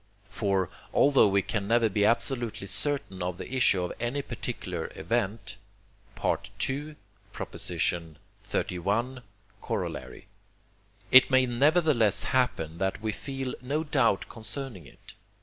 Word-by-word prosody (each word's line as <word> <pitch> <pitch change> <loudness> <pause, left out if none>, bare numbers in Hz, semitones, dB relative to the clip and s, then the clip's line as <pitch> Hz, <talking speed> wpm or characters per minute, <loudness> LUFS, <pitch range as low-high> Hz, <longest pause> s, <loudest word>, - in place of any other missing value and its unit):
For, 95 -3 0 0.2
although 140 -5 +6
we 100 -1 +2
can 100 0 -2
never 115 +1 +4
be 105 0 +1
absolutely 120 -2 +1
certain 100 -1 -1
of 90 0 -2
the 130 - -7
issue 110 -8 +3
of 90 - -3
any 125 +4 -2
particular 95 -9 -5
event 105 +1 -2 0.6
(II. 145 +3 -2 0.4
xxxi. 95 +3 -2 0.6
Coroll.), - - -4 0.9
it 130 0 +9
may 130 -1 +5
nevertheless 135 - +3
happen 85 -11 0
that 95 0 -1
we 110 - 0
feel 135 +3 -5
no 145 +5 -1
doubt 145 -10 +2
concerning 110 - -5
it. - - -16
110 Hz, 115 wpm, -28 LUFS, 95-130 Hz, 0.9 s, it